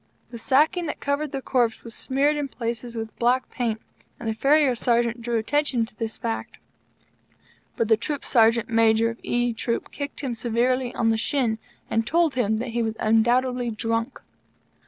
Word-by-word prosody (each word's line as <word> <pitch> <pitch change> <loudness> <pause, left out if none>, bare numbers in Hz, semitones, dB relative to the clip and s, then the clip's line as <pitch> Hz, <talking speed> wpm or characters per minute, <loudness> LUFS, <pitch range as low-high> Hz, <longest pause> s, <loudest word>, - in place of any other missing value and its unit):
The 235 - -7
sacking 310 +8 +2
that - - -4
covered 285 +1 -1
the 270 -2 -4
corpse 240 -4 0
was 230 - -6
smeared 280 +5 +1
in 290 -1 -2
places 235 -1 -4
with 225 -1 -5
black 250 +2 +1
paint; 230 -3 -2 0.4
and 235 - -6
the 220 - 0
Farrier 275 +4 +3
Sergeant 235 0 +1
drew 235 0 -1
attention 255 0 +1
to 225 - -17
this 225 0 -4
fact. 230 -2 -4 1.2
But 230 - +1
the 220 -1 +4
Troop 285 +5 -4
Sergeant 230 -2 +3
Major 225 0 +3
of 230 - -11
E 240 0 0
Troop 230 +1 -3
kicked 285 -1 -5
him 265 -4 -2
severely 240 +2 0
on 225 -1 +2
the 225 - +1
shin, 225 -2 0 0.3
and 225 0 0
told 335 -2 +2
him 220 -4 +1
that 240 +3 -3
he 235 +1 -1
was 220 -1 -1
undoubtedly 240 +3 +2
drunk. 230 +1 -2
235 Hz, 175 wpm, -24 LUFS, 225-260 Hz, 1.2 s, the